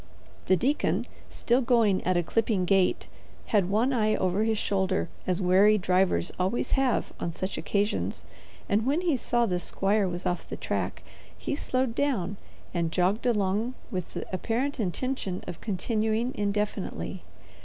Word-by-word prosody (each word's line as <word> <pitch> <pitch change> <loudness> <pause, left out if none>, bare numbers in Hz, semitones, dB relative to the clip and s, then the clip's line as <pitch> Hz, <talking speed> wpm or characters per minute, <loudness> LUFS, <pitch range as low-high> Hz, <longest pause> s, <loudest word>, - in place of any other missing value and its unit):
The 190 - +5
deacon, 275 - +1 0.2
still 245 +2 +1
going 230 -6 +3
at 185 -1 +3
a 175 - +2
clipping 215 0 +1
gait, 190 0 +2 0.5
had 195 -4 +3
one 230 +7 +2
eye 215 -3 +2
over 185 +3 +1
his 220 -1 +1
shoulder 190 -4 0 0.2
as 180 0 +1
wary 195 +3 +5
drivers 180 - +2
always 190 +6 0
have 265 -2 +1
on 170 - -3
such 185 +3 -3
occasions, 205 +1 -1 0.4
and 210 +1 +2
when 295 +6 +2
he 340 -5 +2
saw 240 -1 +1
the 180 -5 0
squire 195 +3 +1
was 175 0 -4
off 175 - -2
the - - -5
track - - -3 0.3
he - - -3
slowed 255 -4 -1
down 215 -9 0 0.4
and 170 -2 0
jogged 190 +8 +1
along 215 +2 +1 0.2
with 180 -3 -4
the - - -3
apparent 245 +9 -1
intention 205 -1 -2
of 165 - -7
continuing 220 +4 0
indefinitely. 205 0 -2
205 Hz, 155 wpm, -28 LUFS, 185-235 Hz, 0.5 s, The